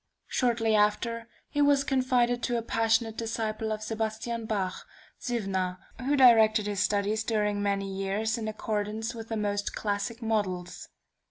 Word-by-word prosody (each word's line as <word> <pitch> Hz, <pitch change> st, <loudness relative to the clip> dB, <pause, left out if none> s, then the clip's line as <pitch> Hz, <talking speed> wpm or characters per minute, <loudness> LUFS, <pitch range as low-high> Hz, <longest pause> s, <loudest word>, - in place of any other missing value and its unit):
Shortly 230 Hz, -3 st, +1 dB
after 225 Hz, +2 st, +1 dB, 0.2 s
he 290 Hz, -, -1 dB
was 285 Hz, -1 st, +4 dB
confided 250 Hz, -2 st, +2 dB
to 240 Hz, -1 st, 0 dB
a 230 Hz, -, -2 dB
passionate 225 Hz, 0 st, +1 dB
disciple 220 Hz, -1 st, -2 dB
of 215 Hz, 0 st, -3 dB
Sebastian 225 Hz, +1 st, -3 dB
Bach, 190 Hz, -4 st, -2 dB, 0.3 s
Ziwna, 195 Hz, -6 st, -1 dB, 0.2 s
who 275 Hz, +3 st, +1 dB
directed 225 Hz, -4 st, +6 dB
his 205 Hz, -2 st, -2 dB
studies 205 Hz, +2 st, +1 dB
during 210 Hz, -2 st, 0 dB
many 200 Hz, -1 st, 0 dB
years 195 Hz, +3 st, -1 dB
in 225 Hz, -2 st, -4 dB
accordance 215 Hz, +1 st, -2 dB
with 225 Hz, -1 st, -8 dB
the 225 Hz, -, -2 dB
most 205 Hz, -1 st, -1 dB
classic 205 Hz, +2 st, -2 dB
models. 190 Hz, -5 st, -2 dB
220 Hz, 145 wpm, -28 LUFS, 205-230 Hz, 0.3 s, directed